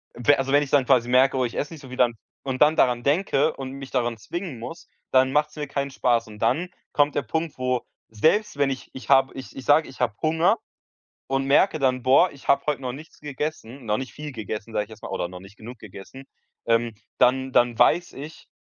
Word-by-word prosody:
we 145 +4 +3
also 135 0 -2
wenn 145 +1 +4
ich 140 - -7
dann 140 -2 +3
quasi 125 -2 +3
merke, 130 +1 +4
oh, 130 - +2
ich 120 - -5
esse 145 - -3
nicht 155 - -11
so 135 - -12
viel, 130 - -8
dann 125 -2 +3 0.3
und 130 -1 -4
dann 150 +1 +6
daran 120 -4 +2
denke 150 0 +2
und 130 -1 -6
mich 135 0 -9
daran 120 -3 -1
zwingen 170 - -6
muss, 165 +9 -9 0.2
dann 130 0 +4
macht's 150 +1 +1
mir 150 -1 -4
keinen 140 0 -3
Spaß 120 -3 +1
und 105 -1 -12
dann 130 - +1 0.2
kommt 145 0 +2
der - - +1
Punkt, 160 +5 -3
wo 125 -1 0 0.3
selbst 160 - +1
wenn 140 -1 +2
ich 135 -1 -5
ich 130 - -10
habe 135 -1 +4
ich 130 - -9
ich 130 - -8
sage, 150 +2 +4
ich 130 - -14
habe 115 -4 0
Hunger 165 +7 +2 0.7
und 135 0 -1
merke 155 +5 +3
dann, 130 -3 +1
boah, 135 +8 +5
ich 140 - -15
habe 140 0 +4
heute 150 -2 -1
noch 125 -1 -3
nichts 150 +5 -12
gegessen, 145 -3 -5
noch 105 -1 +1
nicht 130 0 -6
viel 150 -1 -8
gegessen, 110 -1 -6
sage 105 -1 0
ich 105 - -22
jetzt 110 -1 -13
mal, - - -6
oder, 85 - -3
noch 90 0 -10
nicht 100 +3 -15
genug 120 +2 -10
gegessen, 110 +6 -11 0.4
ähm, 115 0 +1 0.2
dann 130 +1 +2
dann 120 -2 +2
weiß 175 0 +3
ich, 150 +4 -10
135 Hz, 235 wpm, -24 LUFS, 120-145 Hz, 0.7 s, dann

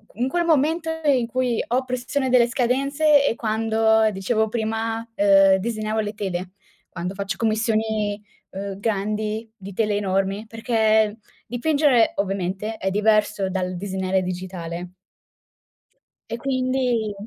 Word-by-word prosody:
In 245 +3 0
quel 345 +5 0
momento 320 +1 +2 0.2
in 255 -5 +3
cui 250 -1 0
ho 255 +2 +1
pressione 255 +2 -2
delle 245 -2 +5
scadenze 275 +5 +2
è 235 - +1
quando, 220 0 +2
dicevo 215 +3 0
prima, 225 0 -2
ehm, 195 -2 +5
disegnavo 215 +1 -2
le 210 -1 -2
tele, 185 -3 -4 0.4
quando 180 +1 -5
faccio 195 0 -4
commissioni, 220 -1 0 0.3
uhm, 195 0 -6
grandi, 215 +1 -2
di 200 -2 -10
tele 210 0 0
enormi, 195 +2 -1
perché 220 -1 +1 0.3
dipingere, 270 -2 +2
ovviamente, 195 +2 -2
è 190 - -1
diverso 210 -1 +2
dal 185 -1 -2
disegnare 190 0 -1
digitale. 180 -1 -5 1.4
E 230 - -2
quindi 255 -4 0
220 Hz, 120 wpm, -23 LUFS, 195-240 Hz, 1.4 s, delle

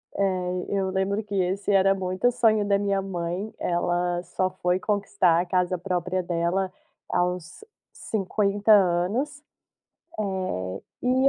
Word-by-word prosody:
Eh, 185 -2 0
eu 195 -1 0
lembro 195 +3 0
que 205 -1 -6
esse 190 +2 0
era 195 0 +5
muito 185 +3 0
o - - +4
sonho 225 -4 +3
da 200 0 +3
minha 200 -1 0
mãe, 185 +2 -4
ela 175 0 0
só 185 +1 -1
foi 180 0 0
conquistar 200 -4 +2
a 175 - 0
casa 180 0 +1
própria 180 0 -2
dela 175 +2 0 0.4
aos 180 - -2 0.3
50 205 0 0
anos. 205 - +3 0.8
Eh, 185 - -2 0.2
e 260 +2 +4
190 Hz, 135 wpm, -25 LUFS, 180-200 Hz, 0.8 s, era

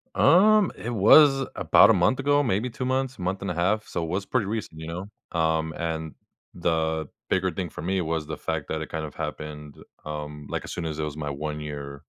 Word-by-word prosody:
Um, 210 +2 +5
it 115 - -6
was 135 +5 +6
about - - +6
a - - +7
month 95 +7 +2
ago, 145 +1 +3
maybe 115 0 0
2 125 +2 -5
months, 130 -1 -1
month 90 +2 -2
and 95 -1 -2
a - - -2
half. 100 +6 0
So, 85 - -3
it 80 - -4
was 95 +3 -2
pretty 125 -1 0
recent, 105 -7 -4
you 80 - -6
know? 90 +4 -6 0.3
Um, 80 0 +1
and 80 -2 -3 0.4
the 80 -2 0 0.2
bigger 95 0 +1
thing 90 +1 -4
for - - -8
me 95 +2 0
was 80 -2 -2
the 80 - -5
fact 80 -3 -3
that 80 - -2
it 80 - -6
kind 80 -1 -3
of 75 - -10
happened, 75 -1 -6 0.3
um, 75 -1 -6
like, - - -3
as - - -8
soon 85 - -4
as 80 -2 -4
it - - -1
was 75 -1 -4
my 75 -2 -3
1 75 +1 -4
year, 70 -2 -7
85 Hz, 225 wpm, -26 LUFS, 75-105 Hz, 0.4 s, a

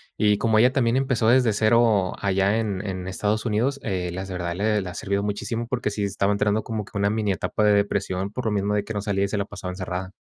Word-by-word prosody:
Y 105 -1 +3
como 110 0 +2
ella 125 +3 +5
también 120 -3 +1
empezó 130 -4 +1
desde 125 -1 +5
cero 110 -3 +3
allá 100 +1 +2
en 105 -3 -2
en 95 -1 -4
Estados 105 +4 -1
Unidos, 120 +6 0
eh, 90 -4 -2
las 95 +2 -5
de - - -5
verdad 85 -1 -3
le 105 +2 +1
le 95 - -5
ha - - -7
servido 100 +1 -2
muchísimo, 110 +3 -3
porque 120 -3 -1
sí 105 0 -3
estaba 100 0 0
entrando 105 +1 +1
como 110 -3 -4
que 100 - -8
una 100 0 +2
mini 105 -2 0
etapa 105 +3 -1
de 105 - +5
depresión 100 -1 0
por 125 +3 -5
lo 110 - +1
mismo 105 0 0
de 105 -1 0
que 110 - -5
no 105 - -2
salía 100 -1 0
y - - -2
se 105 +1 -3
la 100 - 0
pasaba 95 -2 -7
encerrada. 95 0 -5
105 Hz, 260 wpm, -24 LUFS, 95-110 Hz, -, ella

